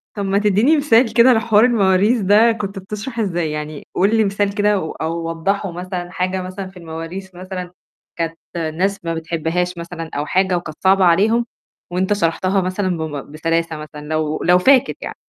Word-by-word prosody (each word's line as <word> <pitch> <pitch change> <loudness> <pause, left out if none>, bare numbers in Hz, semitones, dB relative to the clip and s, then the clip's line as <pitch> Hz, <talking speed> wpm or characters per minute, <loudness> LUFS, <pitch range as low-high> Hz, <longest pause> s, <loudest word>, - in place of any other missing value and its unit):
طَب 200 -1 -3
ما 195 +1 +1
تدّيني 210 +9 +3
مثال 250 -5 +3
كده 240 +2 +6
على 230 -3 +5
حوار 220 0 +4
المواريث 210 0 +3
ده 210 +4 +5
كنت 200 -3 -4
بتشرح 210 +5 -6
إزاي؟ 175 -6 -1
يعني 150 -1 -6
قُل 200 +5 +3
لي 220 - +4
مثال 200 0 -1
كده 205 -1 +2
و 160 - -4
أو 165 +1 -3
وضّحه 195 +3 -1
مثلًا، 180 0 -5
حاجة 185 0 -2
مثلًا 185 +1 -6
في 185 -1 -14
المواريث 170 +3 -7
مثلًا 180 -1 -7 0.4
كانت 165 -1 -3 0.2
الناس 170 +4 -2
ما 165 - -1
بتحبهاش 165 +2 -2
مثلًا 170 -1 -7
أو 145 +1 -1
حاجة، 185 +2 +1
وكانت 155 -3 -7
صعبة 190 0 +5
عليهم، 215 +7 +3 0.5
وأنت 185 +3 +1
شرحتها 190 +1 +1
مثلًا 185 -1 -1
بم 145 -3 -5
بسلاسة 165 +1 -1
مثلًا، 150 -1 -9
لو 155 0 -1
لو 180 +1 +5
فاكر 265 +6 +4
يعني. - - -6
185 Hz, 180 wpm, -19 LUFS, 165-205 Hz, 0.5 s, كده